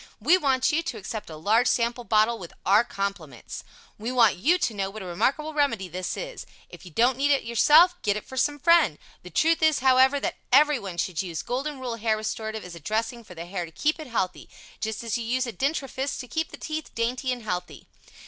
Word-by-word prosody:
We 290 +12 +5
want 275 -4 +2
you 320 +2 +1
to 335 - -5
accept 210 +1 -6
a 160 - -8
large 215 +10 +2
sample 235 +1 0
bottle 225 +1 +2
with 175 -3 -10
our 205 +4 +5
compliments. 200 -3 -5 0.4
We 225 +4 -3
want 235 -4 +4
you 320 - +3
to 240 - -1
know 195 -2 -2
what 215 +1 -8
a - - -8
remarkable 275 - -1
remedy 275 -10 0
this 180 +1 -4
is. - - -7 0.2
If - - -13
you - - -12
don't 240 +8 +2
need 285 +1 +2
it 280 -1 +3
yourself, 300 +10 +5
get 205 0 +1
it 210 - -7
for 260 - -10
some 290 +3 +1
friend. 325 - +4 0.2
The 180 - -11
truth 325 - +2
is, 315 -2 +4
however, 265 +2 +4
that - - -3
everyone 250 - +3
should 175 -1 -1
use 175 -4 -5
Golden 270 +4 -3
Rule 245 -3 -4
Hair 220 -1 +1
Restorative 220 0 -4
as 180 - -9
a 170 - -9
dressing 225 +7 -2
for 180 - -13
the 165 +1 -7
Hair 180 -1 -4
to - - -14
keep 305 - 0
it 310 - -7
healthy, 185 -7 -3 0.3
just 220 +1 -3
as 230 +1 -2
you - - -4
use 255 +3 0
a 235 - -5
dentrifice 275 0 -2
to 250 - -7
keep 320 +5 -2
the - - -10
teeth 310 0 -5
dainty 250 +3 -1
and 245 -2 -4
healthy. 180 -4 -5
235 Hz, 225 wpm, -26 LUFS, 205-280 Hz, 0.4 s, We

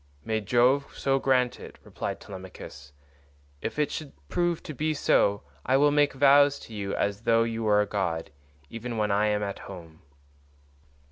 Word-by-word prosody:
"May 110 -1 -1
Jove 125 +6 +2
so 135 0 +1
grant 130 -2 +1
it," - - -11
replied - - -5
Telemachus, 95 -7 -10 0.7
"if - - -4
it 150 -1 +1
should 150 -3 -6 0.2
prove 175 -2 0
to 155 - -7
be 155 +3 -1
so, 100 - +2 0.2
I 130 - +3
will 145 +1 +4
make 145 -1 +3
vows 140 +1 +5
to 115 - -12
you 100 -2 -3
as 100 +1 -1
though 115 0 +3
you 115 0 -3
were 105 -2 +3
a - - +1
god, 90 -6 -2 0.4
even 115 +3 -6
when 105 -1 0
I 105 +2 +2
am 105 0 0
at 100 -1 -4
home." 85 -3 -11
115 Hz, 175 wpm, -27 LUFS, 100-140 Hz, 0.7 s, vows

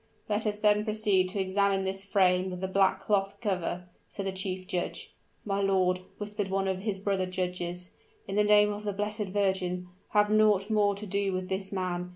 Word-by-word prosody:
"Let 215 +1 0
us 210 0 -1
then 210 0 +3
proceed 210 -4 +2
to 195 - -4
examine 195 0 +1
this 190 0 -3
frame 185 -2 +2
with 180 -1 -6
the 190 - -1
black 190 0 +3
cloth 200 -1 0
cover," 180 -4 -2 0.2
said 200 - -5
the 195 - -1
chief 185 0 -4
judge. 180 -1 -4 0.3
"My 200 -1 0
lord," 185 -2 +2 0.2
whispered 205 -1 -3
one 195 0 0
of 190 -1 -1
his 200 0 -2
brother 195 -1 -1
judges, 180 -1 -3 0.4
"in - - -3
the 210 - +4
name 210 0 +5
of 205 +1 -7
the 205 -1 -2
Blessed 210 +1 -2
Virgin! 185 -2 -1 0.2
have 210 0 +3
naught 215 -1 +4
more 205 -2 +3
to 205 +2 -6
do 200 0 0
with 185 0 -3
this 190 0 -3
man. 180 -2 -2
195 Hz, 195 wpm, -29 LUFS, 185-205 Hz, 0.4 s, name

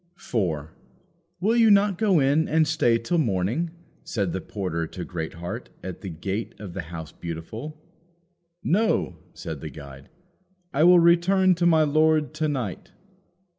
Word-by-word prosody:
4. 80 - -2 0.7
"Will 220 +5 +2
you 230 -2 +5
not 200 -2 +4
go 200 -6 +3
in 145 +4 +2
and 160 0 +2
stay 135 -7 +2
till 165 +9 -1
morning?" 115 - 0 0.3
said 100 -6 -2
the 95 - -3
porter 85 -5 -3
to 90 +1 -7
Greatheart, 85 0 -6
at 95 -2 -7
the 95 - -6
gate 95 +6 -4
of 100 -5 -8
the 95 - -3
House 80 -2 -8
Beautiful. 110 - -7 0.8
"No," 210 +7 +1 0.2
said 80 -4 -6
the 80 - -5
guide; 70 -1 -12 0.6
"I 150 +4 +4
will 180 0 +8
return 175 +3 +4
to 175 0 +1
my 160 -2 +5
lord 155 0 +2
to 155 0 -1
night." 130 -10 -4
125 Hz, 150 wpm, -25 LUFS, -, 0.8 s, will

